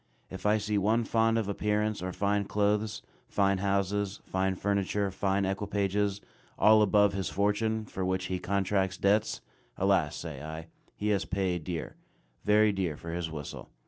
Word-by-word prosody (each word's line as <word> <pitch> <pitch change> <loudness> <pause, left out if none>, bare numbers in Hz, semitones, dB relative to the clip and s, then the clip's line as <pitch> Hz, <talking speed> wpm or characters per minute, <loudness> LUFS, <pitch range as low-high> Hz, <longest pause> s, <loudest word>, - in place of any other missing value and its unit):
If 95 +2 -3
I 105 +1 +4
see 105 0 0
one 110 +4 +2
fond 115 0 +2
of 110 -3 -1
appearance 105 +1 0
or 90 0 -3
fine 100 +2 0
clothes, 105 +1 0 0.2
fine 100 -1 +2
houses, 100 +1 0
fine 95 0 0
furniture, 100 +1 0
fine 95 +1 0
equipages, 100 0 -1 0.4
all 110 0 +6
above 105 -1 +4
his 95 -1 -2
fortune, 110 +2 0
for 95 - -5
which 95 0 -1
he 90 0 -2
contracts 95 0 0
debts, 105 +2 +1 0.4
"Alas," - - +2
say 75 -5 -6
I, 80 +1 -7 0.3
"he 105 - -2
has 100 -2 +1
paid 95 -3 -1
dear, 85 -4 -5 0.5
very 105 0 +4
dear 90 -6 -2
for 85 - -7
his 85 -1 -3
whistle." 75 -3 -7
100 Hz, 160 wpm, -29 LUFS, 95-105 Hz, 0.5 s, all